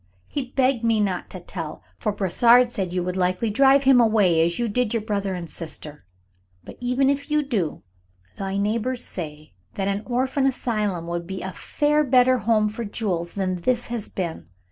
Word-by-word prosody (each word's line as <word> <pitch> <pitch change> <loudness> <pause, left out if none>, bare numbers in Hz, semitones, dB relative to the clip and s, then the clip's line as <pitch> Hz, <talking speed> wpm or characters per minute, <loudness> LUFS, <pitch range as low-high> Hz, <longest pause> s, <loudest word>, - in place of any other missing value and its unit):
He 275 -4 -3
begged 260 -2 +1
me 225 -1 +2
not 190 -4 -1
to 185 - -8
tell, 165 -3 -7 0.2
for 210 - 0
Brossard 235 +6 +4
said 190 -6 -2
you 180 0 -1
would 180 0 -3
likely 185 +4 0
drive 270 +4 +5
him 260 -2 +6
away, 200 -8 +4
as 170 +1 0
you 240 - 0
did 235 +1 0
your 230 - 0
brother 200 -3 -2
and 175 -1 -6
sister. 155 - -7 0.6
But - - -11
even 250 +2 +1
if 280 +2 0
you 300 0 +2
do, 210 - -2 0.5
the 195 0 -3
neighbors 230 +5 -1
say 155 - -6 0.2
that 195 - -1
an 200 +1 -1
orphan 260 +2 +1
asylum 210 -9 -1
would 170 0 -4
be 190 0 -5
a 190 - -4
far 295 - +1
better 255 -1 +4
home 220 -1 +2
for 220 +3 -5
Jules 190 -6 -3
than 185 -2 -1
this 240 +7 0
has 230 -4 -4
been. 170 - -5
210 Hz, 190 wpm, -23 LUFS, 180-250 Hz, 0.6 s, him